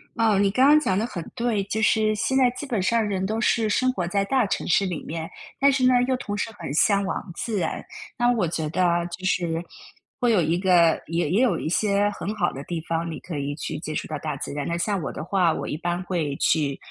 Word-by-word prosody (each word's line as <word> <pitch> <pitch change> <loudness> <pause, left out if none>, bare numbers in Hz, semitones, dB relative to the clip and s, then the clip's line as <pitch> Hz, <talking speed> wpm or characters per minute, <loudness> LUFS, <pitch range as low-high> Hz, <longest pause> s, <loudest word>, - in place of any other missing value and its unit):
哦， 220 -3 +3
你 200 0 +3
刚 255 +6 +4
刚 300 +1 +7
讲 190 -11 0
得 215 - 0
很 180 -8 -5
对， 230 -4 0
就 220 +2 -2
是 220 -1 +3
现 265 +5 0
在 255 -2 +5
基 - - -5
本 235 -8 -1
上 225 +4 +2
人 190 -2 -1
都 220 +3 -2
是 225 -2 +2
生 255 +4 +2
活 180 -7 -2
在 195 +3 0
大 255 +2 +2
城 - - -2
市 195 +3 +3
里 175 -5 -4
面， 160 +1 -5 0.3
但 280 +1 +5
是 265 -1 0
呢， 255 - +5
又 260 - +2
同 205 -5 -4
时 215 - -2
很 160 -5 -5
向 200 +6 +3
往 190 0 -4
自 220 +2 -3
然。 165 - -2 0.3
那 240 +1 +3
我 200 -7 +1
觉 160 -1 -2
得 180 +4 0
啊， 170 -1 +2
就 175 +2 -8
是 170 -3 0 0.6
会 245 -2 +2
有 205 -5 +4
一 165 +2 +1
个 175 -3 +4
也 165 -1 -1
也 195 +8 +2
有 255 - +3
一 - - -3
些 205 +3 +2
很 205 0 -4
好 185 -5 +1
的 135 - -7
地 170 +1 -4
方， 165 0 -1
你 160 - -6
可 170 -4 -6
以 140 0 -3
去 155 0 -5
接 155 0 -5
触 - - -3
到 155 - -4
大 150 -1 -3
自 - - -5
然。 145 -1 -3
那 170 - -1
像 190 +2 -1
我 140 - -4
的 - - -5
话， 175 -1 +2
我 - - -4
一 150 - -3
般 175 +2 -2
会 165 -6 -2
去 145 -4 +1
185 Hz, 275 characters per minute, -24 LUFS, 165-220 Hz, 0.6 s, 刚